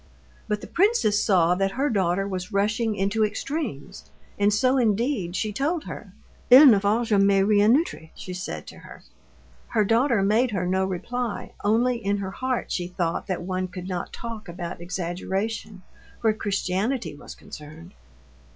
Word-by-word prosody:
But 210 -1 -1
the - - -7
princess 370 - +2
saw 180 -4 +4
that 195 +1 0
her 275 +3 0
daughter 195 -4 0
was 185 +1 -5
rushing 215 +2 0
into 200 +3 +1
extremes, 210 - -4 0.3
and 205 +1 +4
so 255 +5 +2
indeed 220 -4 0
she 215 +1 -2
told 305 - -1
her. - - -9 0.4
"Il 260 +5 +10
ne 225 -8 +7
faut 210 +4 +1
jamais 200 -2 +3
rien 210 +3 +5
outrer," 290 - -4
she 185 - -7
said 185 +1 -5
to - - -12
her. - - -13 0.6
Her 215 -3 +1
daughter 230 0 +2
made 220 +6 +3
her 190 -4 -2
no 190 +1 +1
reply, 215 +5 -4
only 230 +3 +1
in 200 +1 +1
her 195 -1 -4
heart 255 +3 -3
she 175 -1 -2
thought 175 -2 -2
that 185 -2 -3
one 185 0 -2
could 180 0 -8
not 180 -2 -4
talk 225 -4 -7
about 170 0 -6
exaggeration 190 +4 -4 0.4
where 220 -1 +3
Christianity 205 - -2
was 145 - -11
concerned. 155 +4 -12
205 Hz, 160 wpm, -25 LUFS, 185-230 Hz, 0.6 s, Il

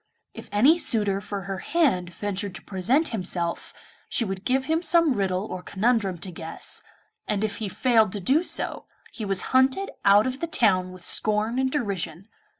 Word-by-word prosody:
If - - -11
any 265 +12 +5
suitor 205 - +2
for 200 -1 -5
her 195 0 -5
hand 260 - +1
ventured 200 +1 -4
to - - -8
present 240 - +1
himself, 180 -5 -3 0.4
she 235 - +1
would 190 -1 -5
give 265 +1 +1
him 320 +2 +1
some 335 -4 +3
riddle 195 -2 -1
or 185 -4 -6
conundrum 200 -2 0
to 185 - -5
guess, 165 -1 -5 0.5
and 210 0 -1
if 215 0 -2
he 215 -3 -4
failed 225 -1 +3
to 205 - -3
do 265 - +2
so, 355 - -4 0.3
he 220 - -5
was 195 -2 +1
hunted 265 +9 +3
out 200 +2 +6
of 260 +1 -3
the 335 - -2
town 185 - +2
with 185 -1 -10
scorn 215 +3 +2
and 265 0 +1
derision. 195 - -3
205 Hz, 180 wpm, -25 LUFS, 185-260 Hz, 0.5 s, out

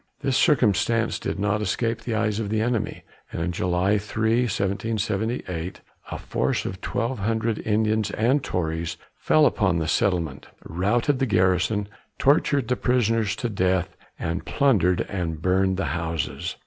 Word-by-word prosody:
This 135 -3 0
circumstance 115 - +2
did - - -3
not 105 +1 0
escape 115 +3 -1
the 115 - -3
eyes 105 0 0
of 105 -3 -3
the 110 +1 0
enemy, 115 0 -1 0.3
and - - -4
on 85 +1 -1
July 90 +4 +1
3, 110 +4 +1
1778, 100 -3 -2 0.3
a - - -4
force - - -1
of 95 - -5
twelve 115 +1 -2
hundred 110 +2 -1
Indians 110 0 +1
and 125 +8 +1
Tories 80 -1 -2 0.2
fell 155 -1 +3
upon 100 -9 +2
the 80 -1 -1
settlement, 85 - 0 0.2
routed 115 - 0
the 135 - +1
garrison, 95 +1 +2 0.3
tortured 140 -2 +2
the 125 - +1
prisoners 115 -5 +1
to 120 - -2
death, 95 -4 0 0.2
and 85 +3 -3
plundered 100 - +2
and 85 -5 -3
burned 95 +2 +1
the 95 - -1
houses. 85 -3 -3
105 Hz, 150 wpm, -24 LUFS, 90-115 Hz, 0.3 s, fell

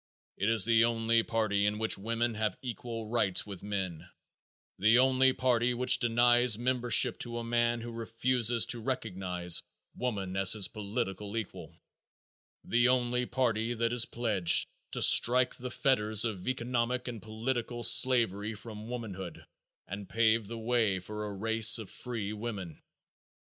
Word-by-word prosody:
It 100 - -1
is 115 -4 +5
the 115 0 +3
only 115 0 +1
party 110 -3 -1
in 105 0 -2
which 110 +1 0
women 115 +3 -2
have 110 0 -3
equal 115 -2 -6
rights 105 -5 0
with 100 -3 -10
men, 95 -5 -5 0.7
the 110 +5 +4
only 130 +1 +3
party 125 -1 0
which 125 +1 +2
denies 120 0 +3
membership 120 -1 +2
to 120 -1 -4
a 120 - -5
man 120 0 -1
who 120 +1 -8
refuses 115 +1 0
to 120 - -3
recognize 95 -8 -1 0.3
woman 100 -7 -4
as 95 -1 +5
his 105 -4 +3
political 105 -1 -5
equal, 110 -4 -8 0.9
the 120 +1 +1
only 125 -1 0
party 120 -2 -1
that 115 +1 -1
is 120 -1 +5
pledged 110 -7 +1 0.3
to - - +3
strike 125 +1 +5
the 125 +1 -8
fetters 110 -5 +2
of 100 -5 -5
economic 125 0 -2
and 115 -4 -7
political 120 +2 -4
slavery 115 -4 +4
from 110 +1 -10
womanhood 95 -8 -8 0.4
and 100 +1 -8
pave 115 -1 +1
the 115 +2 -7
way 115 -4 0
for 105 +3 -7
a 100 - -7
race 110 +1 +4
of 110 -4 -8
free 110 -4 -6
women. 105 -7 -7
115 Hz, 150 wpm, -29 LUFS, 105-120 Hz, 0.9 s, is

